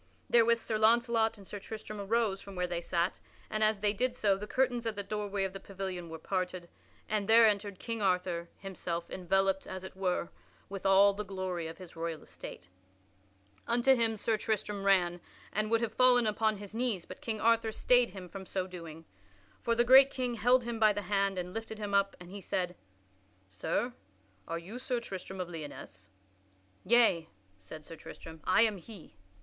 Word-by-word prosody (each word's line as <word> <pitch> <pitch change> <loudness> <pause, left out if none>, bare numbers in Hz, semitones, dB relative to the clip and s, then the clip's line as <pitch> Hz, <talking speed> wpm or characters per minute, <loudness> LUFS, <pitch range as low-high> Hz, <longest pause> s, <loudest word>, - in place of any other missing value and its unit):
Therewith 235 0 +5
Sir 220 -1 -3
Launcelot 230 0 +3
and 200 - -13
Sir 205 - -7
Tristram 215 0 -7
arose 210 -1 0
from 200 -1 -10
where 180 0 0
they 175 -1 -3
sat, 175 +1 -1 0.3
and 215 0 +1
as 215 -2 +2
they 205 -1 +3
did 250 +4 0
so 205 -5 +2
the 205 +2 -6
curtains 245 -2 0
at 220 - -2
the 200 - -3
doorway 205 -1 -2
of 190 -1 -2
the 195 - -6
pavilion 190 -3 -6
were 160 - -6
parted 180 0 -3 0.4
and 210 -1 -1
there 230 +1 +8
entered 205 -2 +1
King 230 +1 -4
Arthur 180 -3 0
himself 175 -3 -5
enveloped, 195 +1 +1
as 185 0 -6
it 190 - -9
were, 180 -2 -1 0.4
with 195 0 -3
all 200 +1 +6
the 210 +1 -4
glory 185 -4 -4
of 165 - -8
his 185 -3 -12
royal 165 -1 -4
estate. 90 - -10 1.0
Unto 240 +3 +4
him 225 -3 +1
Sir 220 +1 +1
Tristram 210 -2 -2
ran, 175 -3 +3 0.3
and 215 +1 0
would 230 0 +2
have 225 -2 -2
fallen 250 -2 +5
upon 215 0 +1
his 205 0 -9
knees, 225 -6 -1
but - - -10
King 225 -6 -3
Arthur 230 0 +3
stayed 245 +2 +3
him 185 -1 -9
from 190 +1 -9
so 185 -1 -2
doing. 165 -3 -9 0.6
For 235 - +1
the 240 - +4
great 265 +2 +8
king 255 -3 -2
held 245 +2 +3
him 235 -1 -4
by 215 -1 +5
the 205 0 -3
hand 195 0 +1
and 180 0 -4
lifted 225 0 -5
him 205 -1 -4
up, 200 0 +2
and 175 0 -11
he 200 0 -7
said, 180 -2 -2 0.7
"Sir, 100 - -2 0.5
are 165 - -2
you 195 +9 -8
Sir 255 -1 -1
Tristram 190 -4 -7
of 180 - -2
Lyonesse?" 145 - -9 0.8
"Yea," 225 -9 +4 0.3
said 150 +11 -11
Sir 165 - -9
Tristram, 160 0 -11
"I 230 - +5
am 215 -3 +1
he." 195 - -12
200 Hz, 190 wpm, -31 LUFS, 180-225 Hz, 1.0 s, there